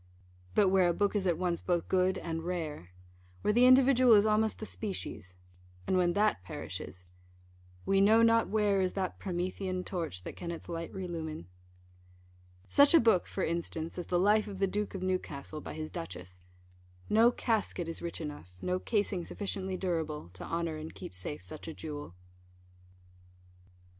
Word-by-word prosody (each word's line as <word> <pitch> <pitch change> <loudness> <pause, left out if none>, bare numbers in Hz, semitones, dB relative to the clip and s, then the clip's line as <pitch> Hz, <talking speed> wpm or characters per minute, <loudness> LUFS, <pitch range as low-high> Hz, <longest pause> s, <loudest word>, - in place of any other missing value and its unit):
But 200 -2 +5
where 185 -2 +4
a 170 - 0
book 205 +1 +1
is 195 -2 +1
at 170 -3 +2
once 175 -1 -1
both 175 -2 0
good 185 0 +2
and 165 -1 -4
rare 160 - -4 0.5
where 210 - +3
the 245 +3 +6
individual 255 -1 +6
is 205 0 +5
almost 215 0 +2
the 215 - -6
species, 190 - -6 0.5
and 190 - +1
when 175 -1 +3
that 210 - +2
perishes, 90 0 -7 0.8
We 195 0 +3
know 220 +3 +6
not 230 0 +4
where 205 -2 +2
is 185 -1 0
that 190 -2 -3
Promethean 185 0 -3
torch 165 - -4
That - - -7
can 170 - -6
its 170 - -6
light 165 -1 -5
relumine 165 - -5 1.2
such 285 +3 +6
a - - +9
book, 225 -6 +3
for 190 - -3
instance, 165 0 -3
as 175 - -5
the 180 - +1
Life 210 +4 +3
of 200 -2 -6
the 195 - +2
Duke 205 +1 -2
of 185 - -4
Newcastle, 155 -5 -3
by - - -7
his 155 0 -5
Duchess 90 +1 -7 0.7
no 230 +3 +5
casket 215 -8 -1
is 165 - -5
rich 170 -1 -4
enough, 145 - -7
no 180 - -1
casing 200 -3 0
sufficiently 190 0 -3
durable, 160 - -3
to 90 - -9
honour 165 -2 -2
and 155 +1 -8
keep - - -8
safe 95 +11 -6
such 155 +1 -9
a 160 - -6
jewel. 145 - -7
180 Hz, 170 wpm, -31 LUFS, 160-205 Hz, 1.2 s, a